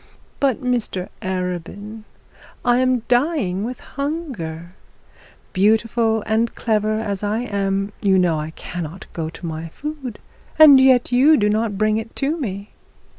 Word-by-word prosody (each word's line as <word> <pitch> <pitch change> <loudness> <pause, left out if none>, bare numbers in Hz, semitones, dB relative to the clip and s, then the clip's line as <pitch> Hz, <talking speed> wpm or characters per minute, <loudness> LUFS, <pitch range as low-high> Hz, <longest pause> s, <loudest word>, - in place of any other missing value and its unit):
But, 270 -4 +1
Mr 235 -7 -1
Arabin, 190 +4 -4 0.6
I 245 0 +4
am 255 -1 +2
dying 245 - +1
with 245 +3 -5
hunger; 260 - -5 0.8
beautiful 220 +2 +2
and 225 +2 0
clever 215 -1 0
as 200 -3 -3
I 210 +2 -1
am, 200 -3 -2
you 195 -2 +3
know 175 -4 +2
I 155 +1 -4
cannot 170 +1 -7
go 160 -2 -3
to 170 - -10
my 160 0 -5
food, 275 - -7 0.4
and 285 -4 +9
yet 255 -2 +4
you 280 +5 +5
do 210 -1 +2
not 215 -1 0
bring 215 +1 +2
it 225 +1 -6
to 285 +3 0
me.' 205 - -5
215 Hz, 140 wpm, -21 LUFS, 190-250 Hz, 0.8 s, and